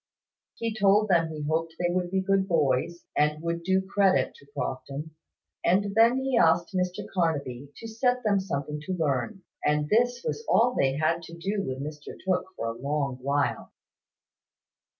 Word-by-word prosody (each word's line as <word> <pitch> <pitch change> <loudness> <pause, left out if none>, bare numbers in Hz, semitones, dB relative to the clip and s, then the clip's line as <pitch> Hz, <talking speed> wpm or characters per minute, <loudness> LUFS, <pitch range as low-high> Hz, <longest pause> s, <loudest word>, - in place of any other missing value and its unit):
He 230 -1 -2
told 205 0 +3
them 170 -3 +4
he 155 -1 -6
hoped 160 +1 -1
they 175 0 0
would 180 -1 0
be 190 +1 0
good 195 0 +2
boys, 155 0 +1
and 150 +1 +2
would 170 0 -2
do 190 +2 +1
credit 195 -1 +2
to 140 - -19
Crofton; 140 +3 -4 0.5
and 195 +3 +2
then 230 +3 +5
he 265 -3 +2
asked 175 -5 +3
Mr 180 -1 -1
Carnaby 145 -7 -1
to 225 - -8
set 245 +3 0
them 205 -3 +3
something 150 -5 -3
to 190 - -1
learn. 160 - -1 0.2
And 150 0 +1
this 245 +3 +2
was 460 -1 -2
all 245 +2 +4
they 135 0 +2
had 160 +2 +1
to 170 0 -10
do 195 +4 -2
with 130 -4 -4
Mr 150 0 -7
Tooke 185 -1 +1
for - - -3
a 115 - -7
long 140 -2 -1
while. 140 +2 -1
170 Hz, 170 wpm, -27 LUFS, 150-200 Hz, 0.5 s, then